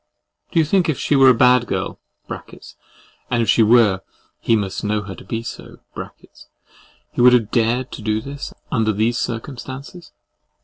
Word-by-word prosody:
Do - - -3
you 160 - +5
think 180 +1 +2
if 155 - 0
she 145 - 0
were 135 -1 +7
a - - +7
bad 125 0 +4
girl - - -3 0.3
(and 120 -2 -7
if - - -3
she 115 - +4
were, 110 -4 +4 0.4
he 115 - +2
must 100 -3 -3
know 105 0 -1
her 95 -1 -7
to 90 - -12
be 115 0 -4
so) - - -9 1.3
he - - -2
would 125 0 +7
have 115 -4 +2
dared 120 +2 +1
to - - -8
do 110 0 0
this, 140 +5 -7 0.2
under 110 -4 +1
these 115 +4 0
circumstances? 130 +7 -6
120 Hz, 170 wpm, -20 LUFS, 110-130 Hz, 1.3 s, were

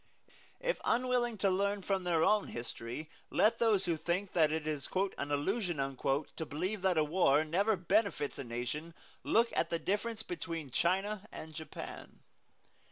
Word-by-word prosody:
If - - -1
unwilling 245 -2 +1
to 195 0 +2
learn 200 +1 0
from 190 -2 0
their 165 -2 +3
own 210 +2 +3
history, 120 +4 -5 0.2
let 215 - +3
those 220 -5 +3
who 170 -2 +1
think 180 +5 -1
that 155 -3 +4
it 160 -1 -1
is 150 -3 -2
an 185 -7 0
"illusion" 175 +5 0
to 135 +3 -1
believe 185 +8 -2
that 185 -3 +2
a 155 - +5
war 150 -2 +4
ever 205 +4 +3
benefits 190 -4 +1
a - - -3
nation 125 +7 -4 0.3
look 230 +1 +3
at 165 - +1
the 170 - 0
difference 215 +5 -2
between 165 -6 -5
China 195 - +1
and 160 0 -8
Japan. 160 0 -8
180 Hz, 160 wpm, -33 LUFS, 155-205 Hz, 0.3 s, a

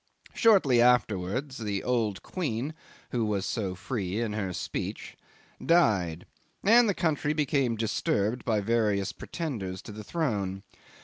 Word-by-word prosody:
Shortly 180 - +5
afterwards 125 +2 +2
the 105 -3 -2
old 115 -5 0
queen, 145 -4 -3 0.4
who 120 -3 0
was 100 -3 -1
so 100 -6 -2
free 100 -1 -3
in 115 -3 -1
her 100 -3 -2
speech, 85 - -5 0.5
died, 95 - +2 0.4
and 230 +3 +6
the 200 - +1
country 150 -2 0
became 140 -5 +1
disturbed 110 +1 0
by 110 -3 +1
various 105 -3 +1
pretenders 110 - -5
to - - -9
the 105 +1 -8
throne. 100 - -2
115 Hz, 130 wpm, -28 LUFS, 100-140 Hz, 0.5 s, and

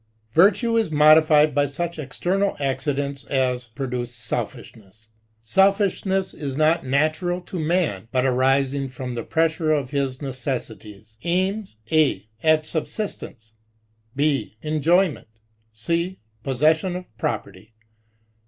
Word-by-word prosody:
Virtue 225 - +4
is 225 -6 +1
modified 155 0 +5
by 145 +1 +2
such 170 +4 -4
external 190 +7 -1
accidents 140 0 -2
as 125 -2 0
produce 120 +1 -4
selfishness. 110 -1 -7 0.3
SeJfiahness 190 - +1
not 155 +2 +3
natural 155 +6 0
to 180 0 -6
many 155 - 0
but 130 0 +1
arising 135 +1 +2
from 125 -1 -6
the 120 - -3
pressure 160 +2 +1
of 140 -4 0
his 135 -2 -1
necessities. 110 -6 -6
Aims 185 - -1
(a) 145 -11 +2
at 155 -1 +3
subsistence, 150 - -5 0.6
(b) 140 -7 0
enjoy 160 +4 +3
ment, - - -12 0.4
(c) 170 +12 -2 0.3
possession 155 +7 +2
of 180 -12 -9
property. 105 -1 -4
145 Hz, 110 wpm, -23 LUFS, 125-170 Hz, 0.6 s, modified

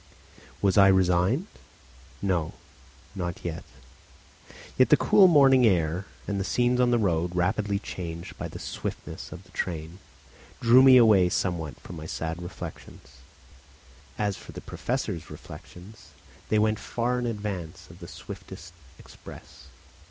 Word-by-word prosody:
Was 100 +1 +4
I 100 - +8
resigned? 95 - +2 0.8
No, 90 -5 0 0.6
not 90 -3 -5
yet. 85 -1 -4 1.1
Yet 130 - +4
the 150 - +6
cool 210 -3 +6
morning 135 -6 +6
air 90 -3 +2 0.2
and 100 -1 -2
the - - -1
scenes 125 +4 +1
on 125 -1 +4
the 120 - +3
road, 90 -4 0
rapidly 100 +3 0
changed 85 -4 -7
by - - -5
the - - -9
swiftness - - -6
of - - -9
the - - -22
train, 85 +1 -5 0.6
drew 120 +2 +6
me 130 -1 +8
away 105 -7 +5
somewhat 85 -5 -2
from 85 - -10
my 80 +1 -8
sad 80 +2 -4
reflections. 90 -2 -10 1.0
As 105 -2 -1
for - - -12
the - - -8
Professor's 105 -10 -4
reflections, 90 +5 -12 0.4
they 110 - +2
went 110 0 +2
far 125 +1 -2
in 125 - -2
advance 100 -7 -5
of 85 - -15
the 85 - -10
swiftest 85 +1 -10 0.2
express. - - -14
95 Hz, 140 wpm, -26 LUFS, 85-115 Hz, 1.1 s, I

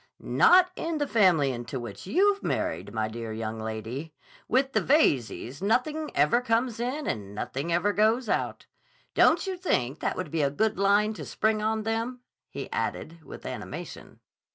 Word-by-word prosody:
"Not 365 0 +5
in 330 -1 -2
the 290 - 0
family 185 - +3
into 125 +2 -5
which 120 - -8
you've 400 - +3
married, - - -2
my 110 -1 -1
dear 115 0 -6
young 110 0 -4
lady. 110 +8 -5 0.3
With 270 +1 +1
the - - +3
Veyzes 140 - +1
nothing 295 +9 0
ever 150 +12 +3
comes 230 -1 0
in 260 +5 -2
and 100 -2 -4
nothing 135 +9 -3
ever 180 +5 +2
goes 220 +4 +2
out. - - -1 0.5
Don't - - +4
you 380 -1 -2
think 145 - -1
that - - -2
would 185 - -4
be 160 -1 0
a 140 - +2
good 210 +7 0
line 205 +2 +3
to - - -7
spring 215 0 0
on 220 0 0
them?" 230 +3 -2 0.3
he - - -6
added 165 +1 -3
with - - -11
animation. - - -7
205 Hz, 170 wpm, -27 LUFS, -, 0.5 s, Not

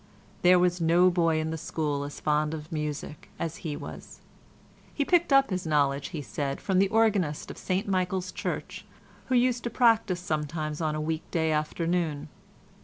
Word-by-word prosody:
There 180 0 +6
was 180 0 +2
no 175 +3 +5
boy 165 -2 +2
in 155 0 -2
the 160 - -4
school 150 -3 -2
as 145 - -8
fond 150 +1 +1
of 155 0 -9
music 150 -1 -5
as 165 -1 -4
he 155 -4 -4
was. - - -9 0.7
He 285 - -1
picked 345 -2 +3
up 275 -4 +5
his 180 -3 -2
knowledge, 140 -2 +1
he 155 -5 -6
said, 140 +3 -3
from 190 -2 +1
the 195 - +4
organist 205 -9 +1
of - - -11
St 190 +2 -1
Michael's 185 -1 -1
Church - - -4 0.4
who 260 - +1
used 245 -1 +2
to - - 0
practise 225 -7 +3
sometimes 155 -2 -3
on 155 -1 0
a - - -2
week 160 +1 -3
day 160 -1 0
afternoon. 155 0 -1
165 Hz, 180 wpm, -27 LUFS, 150-185 Hz, 0.7 s, There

